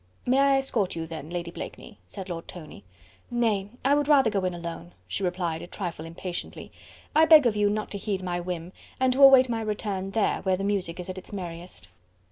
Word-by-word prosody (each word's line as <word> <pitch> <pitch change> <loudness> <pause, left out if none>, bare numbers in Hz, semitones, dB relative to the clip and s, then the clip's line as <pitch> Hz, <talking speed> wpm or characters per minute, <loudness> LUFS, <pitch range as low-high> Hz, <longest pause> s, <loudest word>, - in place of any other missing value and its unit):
"May 260 +2 +3
I 275 0 +5
escort 235 -8 0
you 165 -1 -3
then, 160 -2 -7
Lady 170 -1 -4
Blakeney?" 205 +4 -9
said 195 -2 -8
Lord 170 -2 -6
Tony. 155 - -10 0.5
"Nay! 220 -5 +1 0.2
I 275 - +5
would 290 -1 +2
rather 270 -6 +5
go 195 -2 0
in 180 - -1
alone," 170 - -7
she 195 - -4
replied 175 -3 -1
a - - -8
trifle 175 -4 -5
impatiently. 175 +2 -6 0.4
"I 315 +1 +7
beg 310 -3 +8
of 230 -3 +2
you 205 -1 +3
not 215 +1 -2
to 200 - -4
heed 195 -2 -3
my 175 -1 -2
whim, 175 0 -5 0.3
and 260 -1 +3
to 270 - 0
await 270 -1 +9
my 230 -2 -2
return, 205 -3 -3
there, 215 +2 0
where 190 -1 +1
the 195 - -4
music 195 -4 -1
is 180 - -5
at 185 0 -5
its - - -11
merriest." 175 - -7
195 Hz, 215 wpm, -26 LUFS, 175-230 Hz, 0.5 s, await